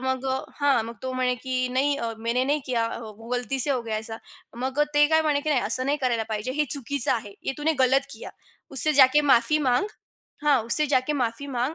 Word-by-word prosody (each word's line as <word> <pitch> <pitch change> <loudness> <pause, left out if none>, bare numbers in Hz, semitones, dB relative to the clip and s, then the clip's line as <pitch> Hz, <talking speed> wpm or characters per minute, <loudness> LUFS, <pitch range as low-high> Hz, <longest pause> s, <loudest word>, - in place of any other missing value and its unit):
मग 260 0 -3 0.3
हां, 275 -5 +2
मग 230 - -8
तो 260 0 -4
म्हणे, 255 -1 0
की 255 +1 -3
"नहीं 275 +3 0
अ, 230 -1 -3
मैंने 235 +3 -1
नहीं 290 +3 0
किया, 235 -3 -1 0.2
वो 220 +1 -12
गलती 250 +2 -1
से 285 - +6
हो 260 -3 0
गया 225 -2 -4
ऐसा." 225 +1 -6 0.4
मग 260 +3 -3
अ, - - +5
ते 295 0 +5
काय 315 0 +3
म्हणे, 295 -2 0
की 310 - -5
"नाही, 275 -4 +2
असं 255 +4 +1
नाही 290 +2 0
करायला 235 -3 0
पाहिजे. 215 +4 -3
हे 300 +2 0
चुकीचं 280 -1 +2
आहे." 210 -4 -5
"ये - - -3
तूने 305 +2 0
गलत 270 +2 +1
किया. - - -9 0.4
उससे 295 +3 +5
जाके 260 +3 +4
माफी 240 +6 +3
मांग 245 +10 +1 0.6
हां, 295 -2 +4
उससे 300 +7 +4
जाके 265 0 0
माफी 245 +1 -3
मांग." 255 +3 -2
255 Hz, 225 wpm, -24 LUFS, 235-285 Hz, 0.6 s, से